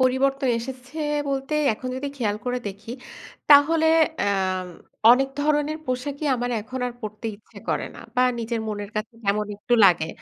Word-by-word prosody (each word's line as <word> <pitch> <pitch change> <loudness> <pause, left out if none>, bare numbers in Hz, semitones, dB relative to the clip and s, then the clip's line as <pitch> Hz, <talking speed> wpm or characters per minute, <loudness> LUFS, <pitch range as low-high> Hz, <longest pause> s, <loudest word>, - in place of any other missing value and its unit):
পরিবর্তন 265 +1 +2
এসেছে 255 +4 -8 0.3
বলতে 270 +2 -2 0.2
এখন 255 +4 -7
যদি 280 +2 -3
খেয়াল 210 -5 -1
করে 250 0 -1
দেখি 200 +3 -10 0.6
তাহলে 315 +3 +7 0.3
আ - - +1 0.9
অনেক 270 +2 +3
ধরনের 300 +1 +1
পোশাকই 275 +4 -3
আমার 245 0 -2
এখন 255 +5 -6
আর 245 - -4
পড়তে 215 0 -6
ইচ্ছে 210 - -16
করে - - 0
না - - -10 0.2
বা 250 - +5 0.2
নিজের 230 0 -2
মনের 205 -1 -5
কাছে 215 +2 -3
কেমন 205 +1 +1
একটু 240 +4 0
লাগে, 170 -4 +5
250 Hz, 160 wpm, -24 LUFS, 215-275 Hz, 0.9 s, তাহলে